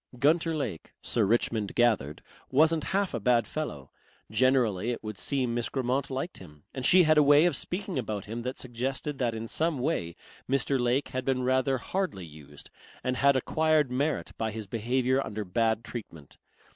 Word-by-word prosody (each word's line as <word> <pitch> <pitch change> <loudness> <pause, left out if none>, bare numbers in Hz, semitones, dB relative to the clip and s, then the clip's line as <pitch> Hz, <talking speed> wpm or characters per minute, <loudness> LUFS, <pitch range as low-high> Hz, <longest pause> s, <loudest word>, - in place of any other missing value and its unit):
Gunter 160 +5 +2
Lake, 110 - -5
Sir 115 -3 +1
Richmond 110 -1 0
gathered, 110 - +1 0.3
wasn't 155 +3 +3
half 195 0 0
a - - -1
bad 120 -3 +3
fellow. 100 - -5 0.4
Generally 120 -4 +2
it 120 - -3
would 110 -1 -5
seem 125 +3 0
Miss 120 -1 -1
Grammont 130 +1 -1
liked 135 +6 -4
him, 75 -5 -14
and 130 - -5
she 180 +7 +6
had 155 -1 +5
a - - +7
way 145 +2 +6
of 175 - +2
speaking 185 -4 -2
about 105 -4 -4
him 115 +3 -5
that 125 +2 -4
suggested 130 +3 -3
that 120 -3 0
in 110 +1 -5
some 160 +4 0
way 125 - -2 0.3
Mr. 135 0 +1
Lake 125 +3 +1
had 130 0 -3
been 130 -1 0
rather 130 +1 +2
hardly 155 - -3
used 75 -2 -13 0.3
and 130 0 -1
had 140 +2 +4
acquired 155 +1 +2
merit 140 +4 -1
by 110 - 0
his 110 0 -6
behaviour 125 +5 0
under 105 0 -5
bad 110 +4 0
treatment. 85 - -9
125 Hz, 180 wpm, -28 LUFS, 110-140 Hz, 0.4 s, a